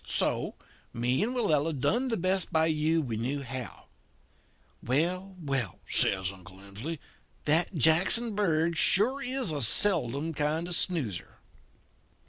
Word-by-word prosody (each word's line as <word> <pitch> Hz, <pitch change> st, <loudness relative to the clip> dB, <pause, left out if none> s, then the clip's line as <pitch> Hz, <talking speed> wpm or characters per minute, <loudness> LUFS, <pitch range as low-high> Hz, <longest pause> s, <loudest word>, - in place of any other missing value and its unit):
So, -, -, -1 dB, 0.4 s
me 120 Hz, +5 st, -1 dB
and 240 Hz, +5 st, -1 dB
Willella 160 Hz, -, 0 dB
done 230 Hz, -, 0 dB
the 230 Hz, -3 st, -1 dB
best 185 Hz, +2 st, 0 dB
by 160 Hz, -1 st, +2 dB
you 160 Hz, 0 st, 0 dB
we 115 Hz, -5 st, -4 dB
knew 135 Hz, +5 st, -3 dB
how. 130 Hz, -3 st, -8 dB, 1.0 s
Well, 180 Hz, +9 st, 0 dB
well,' 135 Hz, -, -3 dB
says 95 Hz, -2 st, +2 dB
Uncle 95 Hz, 0 st, -14 dB
Emsley, 100 Hz, +12 st, -7 dB, 0.5 s
'that 165 Hz, +5 st, +3 dB
Jackson 190 Hz, -, +4 dB
Bird 170 Hz, -5 st, 0 dB
is 160 Hz, -, -3 dB
sure 240 Hz, +9 st, +2 dB
a 250 Hz, -, -2 dB
seldom 155 Hz, -, +2 dB
kind 150 Hz, +3 st, -1 dB
of 175 Hz, -, -7 dB
a -, -, +2 dB
snoozer.'" 150 Hz, -, -1 dB
160 Hz, 135 wpm, -28 LUFS, 130-185 Hz, 1.0 s, Jackson